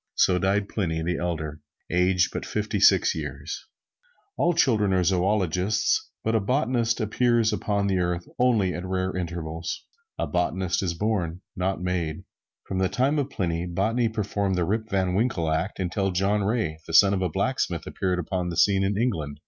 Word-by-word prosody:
So 90 -1 +3
died 100 +2 +1
Pliny 80 -7 -2
the 85 0 -1
Elder, 80 -3 -3 0.3
aged 90 0 +3
but - - -3
fifty - - -2
six - - +5
years. 75 -1 -6 0.7
All 175 - +2
children 110 - +3
are 90 -1 +3
zoologists, 95 +2 +1
but 110 - 0
a 110 - +3
botanist 120 0 +1
appears 115 +1 +2
upon 100 -1 0
the 95 -2 +1
earth 85 -1 -1
only 110 -7 +3
at 90 - -5
rare 95 0 -2
intervals. 85 -2 -4 0.3
A - - -1
Botanist 90 0 0
is 90 -3 -1
born 90 -4 -1
not 95 -1 -1
made. 85 -4 -2 0.4
From 95 - -3
the 95 -1 +2
time 140 +4 +1
of 140 -1 -1
Pliny, 85 -6 -2
botany 110 +7 +1
performed 100 -3 -1
the 90 -1 +1
Rip 110 +4 -1
Van 95 -2 0
Winkle 95 -6 0
act 90 +7 -2
until 95 +2 0
John 95 +3 +1
Ray, 100 -7 -1
the 80 - -2
son 100 +4 +7
of 95 - 0
a 90 - +1
blacksmith, - - -1
appeared 90 -1 -1
upon 90 +1 -2
the 85 - -5
scene 95 +1 +4
in 100 +1 0
England. 80 -12 -1
95 Hz, 175 wpm, -25 LUFS, 85-105 Hz, 0.7 s, son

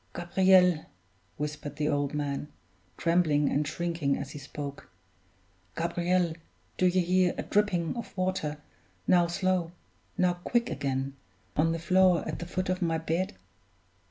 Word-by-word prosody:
"Gabriel," 180 -1 +4 0.5
whispered 150 0 -4
the 150 0 -1
old 145 -1 0
man, 145 -1 -2 0.5
trembling 165 -4 +2
and 145 +1 +1
shrinking 165 -5 -1
as 140 -1 -6
he 145 - -7
spoke, 140 0 -7 0.9
"Gabriel, 175 0 +1 0.4
do 185 - +3
you 185 +1 +3
hear 180 +1 +2
a - - -2
dripping 195 -5 +1
of 235 -4 -7
water 185 -5 -1 0.5
now 175 -1 +4
slow, 175 -1 0 0.4
now 180 -1 +3
quick 240 -1 +1
again 135 0 -2 0.4
on 165 +2 +3
the 165 - -1
floor 180 0 +3
at - - -4
the 175 - -5
foot 185 +1 -2
of 185 0 -1
my 165 -2 +1
bed?" 165 +5 -2
170 Hz, 140 wpm, -29 LUFS, 150-185 Hz, 0.9 s, Gabriel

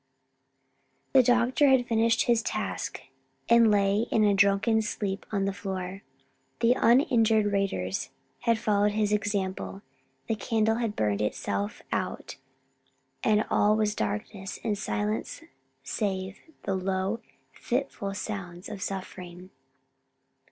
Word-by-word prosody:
The 265 - +8
doctor 245 +3 +3
had 260 -2 +4
finished 230 0 +3
his 235 -2 +3
task, 215 -1 -3 0.5
and 235 -1 +6
lay 205 +2 +2
in 220 - +3
a 205 -1 +4
drunken 200 +3 +3
sleep 205 -2 -3
on 200 -2 0
the 195 - -1
floor. 190 -1 -5 0.6
The 235 +1 +4
uninjured 230 -3 +4
raiders 195 - -1 0.3
had 230 -2 +2
followed 205 -1 +2
his 210 -1 +1
example, 200 -1 -2 0.4
the - - -1
candle 220 +1 +1
had 230 -3 -2
burned 105 -1 0
itself 100 -1 -2
out - - -3 0.9
and 215 0 +3
all 210 +1 +4
was 215 -1 +1
darkness 185 - -4
and 210 - 0
silence 105 - -3 0.4
save 190 +4 -3 0.2
the 195 - -1
low, 190 +3 -1 0.3
fitful 240 -6 -3
sounds 185 -4 -6
of 210 -3 -7
suffering. 185 -1 -6
205 Hz, 120 wpm, -28 LUFS, 190-225 Hz, 0.9 s, The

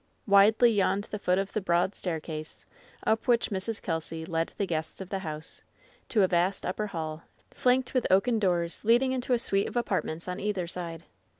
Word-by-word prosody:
Widely 215 +4 +6
yawned 200 -1 +1
the 210 - -3
foot 180 -2 +1
of 195 0 -2
the 215 - 0
broad 175 +1 +1
staircase, 160 -3 -5 0.4
up 220 +3 +1
which 235 -2 +3
Mrs. 205 +3 -3
Kelsy 160 -1 -3
led 165 -1 -1
the 200 - 0
guests 160 -3 -2
of 190 -2 -7
the 195 - -2
house, 155 -3 -6 0.5
to 210 -4 +3
a - - +5
vast 180 +2 +1
upper 210 +4 -2
hall, 160 -4 -5 0.3
flanked 255 0 +1
with 255 -3 +1
oaken 220 +5 +3
doors 175 -4 0
leading 240 +4 +4
into 255 0 -2
a - - +4
suit 200 -4 0
of - - -8
apartments 170 -8 -2
on 180 +1 -4
either 200 -3 -1
side. 170 -1 -6
190 Hz, 190 wpm, -28 LUFS, 170-215 Hz, 0.5 s, Widely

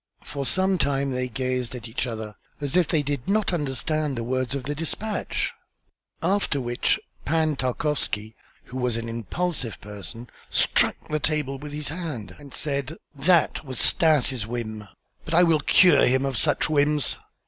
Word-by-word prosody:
For 140 -2 -4
some 190 0 +2
time 140 -1 +1
they 125 0 -1
gazed 125 0 -2
at 120 -1 -7
each 115 +3 -2
other, 110 -2 -5 0.2
as 145 0 -3
if 180 -3 +4
they 155 -4 +2
did 140 -3 -3
not 210 -2 +2
understand 150 -1 -1
the 115 - -2
words 130 +2 -1
of 135 - -3
the 145 +3 -2
despatch; 165 +8 -2 0.7
after 185 -5 +1
which 120 -1 +1 0.2
Pan 155 0 +1
Tarkowski, 125 -5 -2 0.3
who 130 - -8
was 125 -2 +1
an 115 0 -4
impulsive 115 - -3
person, 105 +4 -8 0.2
struck - - +3
the 155 - 0
table 145 -3 -1
with 150 +1 -7
his 150 0 -3
hand 155 - -5
and 145 -2 -12
said: 140 +1 -2 0.2
"That 160 +4 +3
was 130 -4 -5
Stas' 135 -8 +3
whim, 110 -3 -5 0.4
but 165 - -2
I 175 - +7
will 165 -3 +4
cure 180 +5 +6
him 130 +2 +2
of 135 -2 -1
such - - +3
whims." 150 -2 +2
140 Hz, 165 wpm, -25 LUFS, 125-155 Hz, 0.7 s, I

